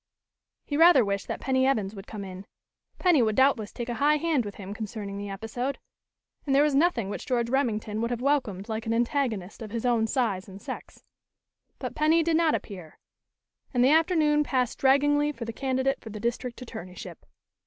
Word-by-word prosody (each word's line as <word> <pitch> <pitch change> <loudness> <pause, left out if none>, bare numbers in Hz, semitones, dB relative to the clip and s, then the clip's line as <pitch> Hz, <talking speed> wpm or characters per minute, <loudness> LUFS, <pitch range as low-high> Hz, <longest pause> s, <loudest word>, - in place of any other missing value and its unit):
He 290 - -2
rather 325 -7 +7
wished 200 0 -2
that - - -4
Penny 260 0 +1
Evans 215 -7 0
would 195 -1 -10
come 205 -2 -6
in; 190 +1 -9 0.5
Penny 350 -7 +4
would 215 -2 +1
doubtless 260 -6 +3
take 240 - -6
a 240 - -2
high 300 +1 +4
hand 300 -6 0
with 205 - -7
him 200 0 -7
concerning 205 -2 -6
the 205 0 -5
episode, 230 +7 -4 0.7
and 275 -2 +1
there 280 - +6
was 300 -1 +2
nothing 275 - +2
which 200 - -6
George 240 -3 0
Remington 220 -5 0
would 235 - 0
have 240 -1 -2
welcomed 250 -8 0
like 220 0 -4
an 225 - +1
antagonist 235 -5 -1
of 220 - -6
his 230 +2 -4
own 235 -2 +2
size 215 -6 -1
and 190 +1 -10
sex. - - -8 0.7
But - - -5
Penny 315 +2 +3
did 330 0 +1
not 325 -1 +3
appear, 180 -7 -8 0.8
and 245 - +4
the 260 - +5
afternoon 310 -2 +3
passed 255 -4 -1
draggingly 290 +2 +3
for 230 -3 -6
the 230 - -5
candidate 265 +1 -1
for 225 - -9
the 215 0 -7
district 235 +2 -3
attorneyship. 185 -6 -9
240 Hz, 195 wpm, -27 LUFS, 210-280 Hz, 0.8 s, rather